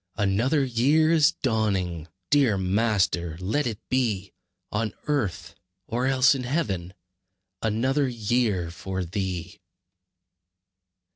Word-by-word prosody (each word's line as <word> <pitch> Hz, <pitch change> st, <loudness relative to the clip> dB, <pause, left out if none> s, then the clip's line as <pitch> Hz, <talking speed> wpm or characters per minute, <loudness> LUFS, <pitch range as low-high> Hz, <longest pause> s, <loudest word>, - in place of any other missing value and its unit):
Another 115 Hz, +8 st, +2 dB
year 140 Hz, +6 st, +3 dB
is 160 Hz, -1 st, +4 dB
dawning! 95 Hz, -, 0 dB, 0.2 s
Dear 135 Hz, -8 st, +4 dB
Master, 95 Hz, -4 st, +1 dB
let 110 Hz, +10 st, 0 dB
it 110 Hz, -3 st, -3 dB
be 110 Hz, -7 st, -1 dB, 0.4 s
On 110 Hz, 0 st, -2 dB
earth, 140 Hz, -, -2 dB, 0.3 s
or 120 Hz, +5 st, -1 dB
else 135 Hz, +1 st, +5 dB
in 135 Hz, -, -3 dB
heaven, 100 Hz, -, -2 dB, 0.7 s
Another 130 Hz, +6 st, +1 dB
year 110 Hz, -7 st, 0 dB
for 95 Hz, +1 st, -4 dB
Thee! 90 Hz, -1 st, -4 dB
110 Hz, 100 wpm, -25 LUFS, 95-130 Hz, 0.7 s, else